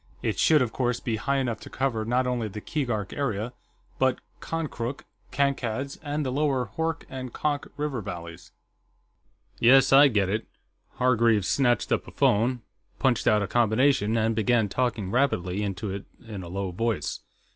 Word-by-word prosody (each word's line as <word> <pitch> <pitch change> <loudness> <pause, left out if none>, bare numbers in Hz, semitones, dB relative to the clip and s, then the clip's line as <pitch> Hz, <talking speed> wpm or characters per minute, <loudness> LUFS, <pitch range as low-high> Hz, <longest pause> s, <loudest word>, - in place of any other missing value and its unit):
It - - -1
should, 155 -4 +5
of 120 - -4
course, 125 -2 0
be 115 -3 -2
high 140 +5 0
enough 120 -5 -1
to - - -11
cover 130 -5 -1
not 125 +3 +1
only 125 -3 -1
the 105 +1 -7
Keegark 115 -6 -3
area, 120 -4 -2 0.5
but 130 -1 +3 0.2
Konkrook, 140 -6 -4 0.3
Kankad's, 135 -1 -1
and 150 -1 -3
the 130 - -1
lower 135 -5 0
Hoork 165 0 -1
and 130 -2 -6
Konk 145 +1 -2
river 145 -5 -2
valleys." 85 -4 -8 1.1
"Yes, 135 +3 +6
I 140 +2 +9
get 105 -7 +1
it." 105 +3 -2 0.5
Hargreaves 115 -5 +3
snatched 125 -3 +2
up - - 0
a - - -9
phone, 120 +3 +2 0.3
punched 130 -4 +1
out 105 -1 +4
a - - -2
combination, 115 0 +2
and 110 0 +1
began 110 0 +2
talking 115 -5 -1
rapidly 100 -8 +1
into 100 0 -3
it 100 +1 -6 0.2
in 105 -4 -6
a 90 - -8
low 95 +1 -3
voice. 115 +5 -2
120 Hz, 165 wpm, -26 LUFS, 105-135 Hz, 1.1 s, I